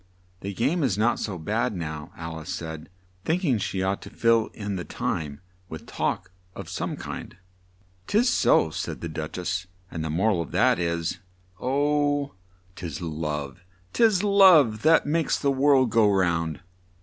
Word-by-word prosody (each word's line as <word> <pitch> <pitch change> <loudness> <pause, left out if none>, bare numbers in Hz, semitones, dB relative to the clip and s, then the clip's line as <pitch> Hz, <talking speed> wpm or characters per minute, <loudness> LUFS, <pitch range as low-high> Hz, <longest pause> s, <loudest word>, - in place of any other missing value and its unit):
"The 100 +1 -6
game 140 - +1
is 120 -9 +1
not 115 +3 +2
so 100 -4 -3
bad 110 +7 -1
now," 80 -1 -5
Al 80 -1 -6
ice 80 +3 -10
said, 80 -1 -6 0.3
think 175 - 0
ing 125 -8 +2
she 95 -1 -2
ought 95 +1 -1
to - - -9
fill 115 -1 +2
in 100 -2 -4
the 90 - -4
time 75 -1 -4 0.3
with 80 - -8
talk 95 0 -2 0.2
of - - -8
some - - -3
kind. - - -8 0.7
"'Tis 230 +5 +3
so," 80 - +3
said 80 -1 -5
the 85 - -3
Duch 80 0 -5
ess, 90 +1 -2 0.2
"and 80 - -4
the 80 - -3
mor 95 +8 +2
al 90 -5 0
of 85 - -6
that - - +3
is 85 -1 -2 0.4
'Oh, 145 +2 +1 0.4
'tis 85 -5 -6
love, 75 -1 -4 0.3
'tis 215 -5 +3
love, 180 - +6
that 160 +2 +5
makes 160 +2 +1
the 140 - +1
world 135 -3 +3
go 110 -1 +4
round!'" 85 -4 0
95 Hz, 170 wpm, -25 LUFS, 80-135 Hz, 0.7 s, love